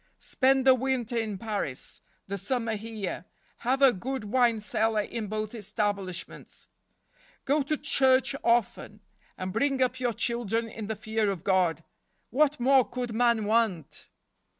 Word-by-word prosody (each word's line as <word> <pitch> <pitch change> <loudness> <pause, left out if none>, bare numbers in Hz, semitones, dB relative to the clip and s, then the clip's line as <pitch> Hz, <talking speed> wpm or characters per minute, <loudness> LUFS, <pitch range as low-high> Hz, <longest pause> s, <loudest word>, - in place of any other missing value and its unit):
Spend 265 0 +2
the 260 - +8
winter 255 -2 -1
in 220 -3 -1
Paris, 205 - -4 0.2
the 200 - -4
summer 230 +3 -1
here. 215 -4 -5 0.3
Have 265 +3 0
a 265 -2 +7
good 255 +5 -4
wine 235 +1 +2
cellar 220 0 0
in 220 +1 -5
both 215 +1 -3
establishments. 205 -4 -4 0.8
Go 290 +3 +2
to 300 +3 -1
church 265 -2 +3
often, 225 -2 0 0.4
and 185 0 -4
bring 275 +3 +1
up 255 0 +1
your 245 -2 0
children 230 0 -1
in 220 -2 -7
the 220 - -2
fear 215 0 -1
of 190 -4 -4
God. 180 -5 +1 0.5
What 295 +3 +2
more 260 +1 +5
could 245 -2 -4
man 235 -2 +2
want 210 -8 0
230 Hz, 145 wpm, -28 LUFS, 205-255 Hz, 0.8 s, the